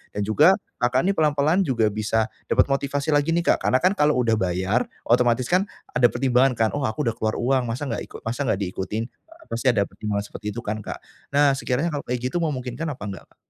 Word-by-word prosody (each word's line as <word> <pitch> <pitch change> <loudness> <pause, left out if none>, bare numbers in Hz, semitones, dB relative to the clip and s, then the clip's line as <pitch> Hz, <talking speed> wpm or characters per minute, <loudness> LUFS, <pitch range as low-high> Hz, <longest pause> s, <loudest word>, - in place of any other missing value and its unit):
dan 105 - -1
juga 150 - +5 0.3
Kakak 125 +2 +2
nih - - -4
pelan-pelan 150 +4 +3
juga 115 -5 +2
bisa, 110 +1 0 0.2
dapat - - +4
motivasi 140 +2 -1
lagi 145 +2 +2
nih 170 - 0
Kak, - - +1
karena 130 - +4
kan 185 - +5
kalau 150 -6 +2
udah 115 - +2
bayar, 95 +5 0 0.2
otomatis 120 +1 +3
kan 185 +3 +3 0.3
ada 125 -1 +5
pertimbangan 130 +1 +2
kan, 110 -1 +2
"Oh 145 - -2
aku 110 +7 -2
udah 115 - +1
keluar 110 -1 -2
uang, 130 0 +1
masa 125 +6 -3
nggak - - -2
iku - - -15
masa 125 +5 -2
nggak 100 - +1
diikutin?" 95 +5 -3 0.5
pasti 115 +3 -2
ada 110 -5 +4
pertimbangan 100 -1 -3
seperti 105 - -9
itu 120 - -4
kan 105 +1 -3
Kak. 105 - -7 0.3
Nah, 145 -1 +5
sekiranya 135 +5 -1
kalau 145 -2 -4
kayak 125 0 -1
gitu 175 - -1
memungkinkan 135 -2 -3
apa 140 -7 -5
enggak 100 -2 -7
Kak? - - -30
125 Hz, 220 wpm, -23 LUFS, 110-145 Hz, 0.5 s, juga